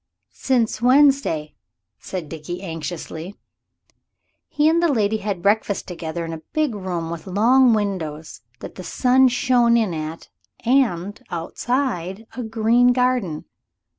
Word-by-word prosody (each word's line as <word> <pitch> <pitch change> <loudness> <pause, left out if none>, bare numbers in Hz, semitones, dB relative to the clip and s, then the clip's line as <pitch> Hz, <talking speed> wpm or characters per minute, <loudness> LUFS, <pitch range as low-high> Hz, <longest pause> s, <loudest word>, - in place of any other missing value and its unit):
"Since 235 -4 0
Wednesday," 255 - +3 0.5
said 180 -5 -6
Dickie 165 +4 -7
anxiously. 165 +1 -6 1.1
He 300 0 +2
and 330 +2 +3
the 340 -3 +3
lady 220 -4 +1
had 200 -4 -4
breakfast 205 0 +1
together 170 -1 -5
in 165 - -5
a 160 - -7
big 305 -5 +1
room 180 -5 -4
with 170 +2 -7
long 235 +6 +4
windows 165 - -4 0.2
that - - -8
the 185 - -9
sun 260 +6 +3
shone 245 -1 +3
in 215 -6 0
at, 155 +1 -6 0.4
and, 210 -7 +1
outside, 195 +2 -3
a 250 - -4
green 230 +2 +3
garden. 250 -11 0
205 Hz, 130 wpm, -22 LUFS, 170-250 Hz, 1.1 s, long